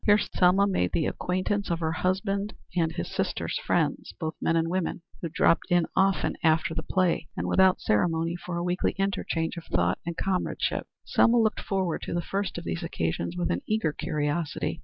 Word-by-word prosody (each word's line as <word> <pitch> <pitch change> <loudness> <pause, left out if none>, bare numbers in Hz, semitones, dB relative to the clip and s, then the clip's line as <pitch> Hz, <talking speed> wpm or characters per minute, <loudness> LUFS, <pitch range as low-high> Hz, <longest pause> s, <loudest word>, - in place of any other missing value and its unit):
Here 205 -1 +6
Selma 190 -1 +3
made 90 - 0
the 160 - +1
acquaintance 185 +3 -1
of 170 -1 0
her 160 -1 0
husband's 195 +4 -1 0.2
and 165 -2 +2
his 165 - -4
sister's - - -2
friends, - - 0
both 160 -2 -2
men 165 - +2
and 165 0 +2
women, 180 -1 -2 0.2
who 170 - -3
dropped 165 +1 +3
in 175 -1 +4
often 195 0 +2
after 160 -1 +2
the 160 - -2
play 180 -2 +1
and - - -2
without 190 -1 +4
ceremony 165 +9 +1
for 175 0 -5
a 170 - -1
weekly 180 +1 0
interchange 180 -4 -1
of 170 - -7
thought 85 +1 +1
and 170 -1 -5
comradeship. 190 -2 -1 0.2
Selma 240 +1 +4
looked 220 -2 +2
forward 190 -4 -1
to - - -4
the 175 - +1
first 195 +1 -2
of - - -5
these 85 0 -3
occasions 85 +1 -2
with 85 -2 0
an 85 - -1
eager 215 -8 +1
curiosity. 155 0 -2
170 Hz, 190 wpm, -27 LUFS, 160-190 Hz, 0.2 s, Here